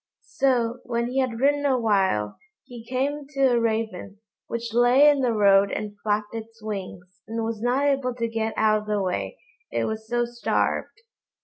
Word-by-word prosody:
So, 245 -3 +1
when 235 -1 -1
he 265 - 0
had 250 -3 -1
ridden 285 +2 +2
a 270 -3 +2
while, 190 - +1 0.2
he 240 -2 -11
came 275 +4 -2
to 270 -2 +4
a 240 - +3
Raven, 220 -3 -2 0.3
which 235 -1 -4
lay 245 +4 +5
in 290 -1 +5
the 250 -2 +2
road 200 -2 +4
and 210 -1 -4
flapped 210 0 -1
its 225 0 -8
wings, 185 -3 -7
and 225 0 -3
was 225 -1 -3
not 250 +4 +1
able 270 -3 0
to 230 -1 -1
get 225 -1 -2
out 215 -1 +3
of 210 - -12
the 210 -1 0
way, 190 - -2 0.3
it - - -1
was 220 0 -4
so 240 +1 0
starved. 240 - -2
230 Hz, 185 wpm, -24 LUFS, 210-250 Hz, 0.3 s, lay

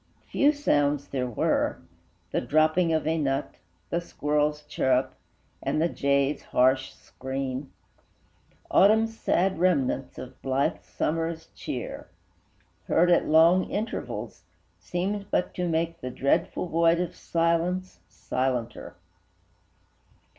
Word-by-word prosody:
Few 285 +1 +4
sounds 145 - +1
there 130 -2 -2
were: 120 - 0 0.5
the - - 0
dropping 155 +6 +2
of 160 -1 0
a 160 +1 +1
nut, 135 -1 -1 0.4
The 170 - 0
squirrel's 150 -2 -1
chirrup, 130 -2 0 0.5
and - - -1
the 165 +2 +2
jay's 140 0 +1
harsh 130 +1 +2
scream, 130 +1 -5 1.0
Autumn's 220 +3 +4
sad 190 0 +1
remnants 140 -7 +1
of 130 0 -10
blithe 135 +1 0
Summer's 165 +1 -3
cheer, - - -6 0.8
Heard 175 +2 +3
at 175 - +3
long 165 +4 +5
intervals, 215 +3 -4 0.4
seemed 200 +3 -3
but - - 0
to 180 -1 -2
make 165 +1 -1
The 130 - -4
dreadful 140 +7 0
void 165 0 +3
of 180 -1 -3
silence 170 +2 -1
silenter. 125 -2 -3
160 Hz, 110 wpm, -26 LUFS, 135-175 Hz, 1.0 s, long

